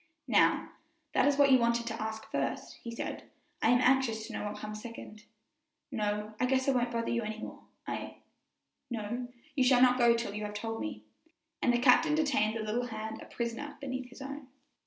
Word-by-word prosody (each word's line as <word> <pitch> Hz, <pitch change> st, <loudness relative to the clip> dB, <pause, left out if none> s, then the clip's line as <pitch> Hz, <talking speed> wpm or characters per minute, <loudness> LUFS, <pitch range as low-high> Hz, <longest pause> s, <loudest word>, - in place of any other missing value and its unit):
"Now, -, -, +3 dB, 0.4 s
that -, -, +4 dB
is 285 Hz, -1 st, +3 dB
what 280 Hz, -1 st, +6 dB
you 260 Hz, -, +7 dB
wanted 235 Hz, 0 st, +2 dB
to 225 Hz, -1 st, -4 dB
ask 220 Hz, 0 st, -4 dB
first," -, -, -2 dB
he 235 Hz, -, -7 dB
said; 230 Hz, -, -5 dB, 0.3 s
"I -, -, +4 dB
am 245 Hz, +1 st, +5 dB
anxious 250 Hz, -4 st, +3 dB
to 230 Hz, -, -8 dB
know -, -, -3 dB
what 210 Hz, 0 st, -4 dB
comes 210 Hz, 0 st, -6 dB
second." 220 Hz, -2 st, -9 dB, 0.7 s
"No, 210 Hz, 0 st, -2 dB
I 250 Hz, -, +2 dB
guess 260 Hz, +1 st, +2 dB
I -, -, +5 dB
won't 245 Hz, -2 st, +1 dB
bother 230 Hz, -1 st, -1 dB
you 235 Hz, -, +1 dB
any 215 Hz, 0 st, -4 dB
more; 220 Hz, -, -8 dB, 0.2 s
I -, -, -4 dB, 0.4 s
" -, -, -54 dB
"No, 235 Hz, +4 st, -4 dB, 0.3 s
you 265 Hz, -, +3 dB
shall 250 Hz, -1 st, +5 dB
not 250 Hz, 0 st, +5 dB
go 235 Hz, -1 st, +6 dB
till 230 Hz, -3 st, -3 dB
you 210 Hz, +1 st, -4 dB
have 210 Hz, 0 st, -5 dB
told 225 Hz, +1 st, -3 dB
me;" 105 Hz, 0 st, -5 dB, 0.6 s
and 245 Hz, -, +4 dB
the 240 Hz, -, +3 dB
captain 255 Hz, +5 st, +5 dB
detained 260 Hz, -8 st, +2 dB
the 220 Hz, -, -3 dB
little 235 Hz, +3 st, -1 dB
hand 220 Hz, -1 st, -5 dB
a -, -, -9 dB
prisoner 235 Hz, +5 st, -4 dB
beneath 260 Hz, -2 st, -4 dB
his 250 Hz, +2 st, -10 dB
own. 280 Hz, 0 st, -7 dB
235 Hz, 210 wpm, -31 LUFS, 220-255 Hz, 0.7 s, you